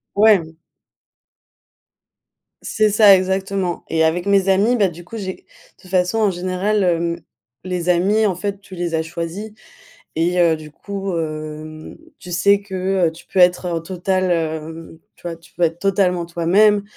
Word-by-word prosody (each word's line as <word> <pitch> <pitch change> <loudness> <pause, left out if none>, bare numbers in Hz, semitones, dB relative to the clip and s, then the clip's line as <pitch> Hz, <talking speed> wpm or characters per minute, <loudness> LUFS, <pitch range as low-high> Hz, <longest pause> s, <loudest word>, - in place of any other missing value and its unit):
Ouais. 195 -7 +3 2.0
C'est 215 0 +1
ça 205 -1 +7
exactement. 190 -1 -2
Et 160 0 +1
avec 170 +3 +1
mes 195 -1 +3
amis, 205 +6 +3
bah, 205 -5 +2
du 175 0 -12
coup 225 - -8
j'ai 190 -3 -6 0.3
toute 185 - -16
façon 180 +3 +1
en 215 -2 +3
général, 185 +3 -1
hem, 170 -1 0 0.4
les 180 -1 -4
amis 195 +5 +3
en 190 -4 +1
fait 200 +1 -4
tu 195 -2 -12
les 175 -2 -2
as 160 - 0
choisis 170 +6 -6 0.6
et 175 +3 +1
heu, 170 -2 +4
du 155 -1 -11
coup, 195 +3 -5
hem, 155 0 -6 0.2
tu 180 - -10
sais 200 +4 +3
que, 190 -2 0
heu, - - -2
tu 165 - -15
peux 190 - -2
être 180 0 +4
en 170 -2 -2
total, 185 +2 -1
hem 160 0 -4 0.2
tu - - -25
vois, 170 -1 -4
tu 165 +1 -21
peux 175 - -1
être 165 0 0
totalement 180 -3 +1
toi-même. 200 +5 +3
180 Hz, 165 wpm, -19 LUFS, 165-195 Hz, 2.0 s, ça